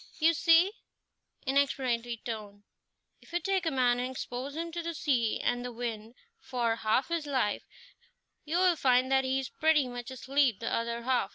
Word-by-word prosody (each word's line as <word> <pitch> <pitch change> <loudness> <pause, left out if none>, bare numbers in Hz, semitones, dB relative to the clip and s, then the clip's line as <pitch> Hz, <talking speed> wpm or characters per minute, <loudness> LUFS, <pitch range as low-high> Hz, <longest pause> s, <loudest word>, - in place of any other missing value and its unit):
"You 330 +1 +4
see" 330 +4 +5 0.7
in 270 +1 +1
explanatory 240 -4 0
tone 210 -3 -6 0.6
"if - - -18
you 345 - +2
take 380 -2 0
a - - +4
man 250 -2 +2
and 250 +1 -2
expose 260 +2 -5
him 335 +1 -4
to 340 +1 -3
the 335 0 -4
sea 250 -8 +1
and 245 0 0
the 245 - -5
wind 230 -1 -5 0.2
for 235 - -1
half 225 +6 +1
his 335 -3 -2
life, 260 -7 -1 0.8
you'll 350 +3 +3
find 255 -1 +3
that 265 0 +3
he 260 +1 +1
is 265 - -4
pretty 310 -4 +2
much 245 0 -6
asleep 260 -3 +1
the 230 - -3
other 235 0 -2
half. 255 0 +1
260 Hz, 180 wpm, -30 LUFS, 240-305 Hz, 0.8 s, see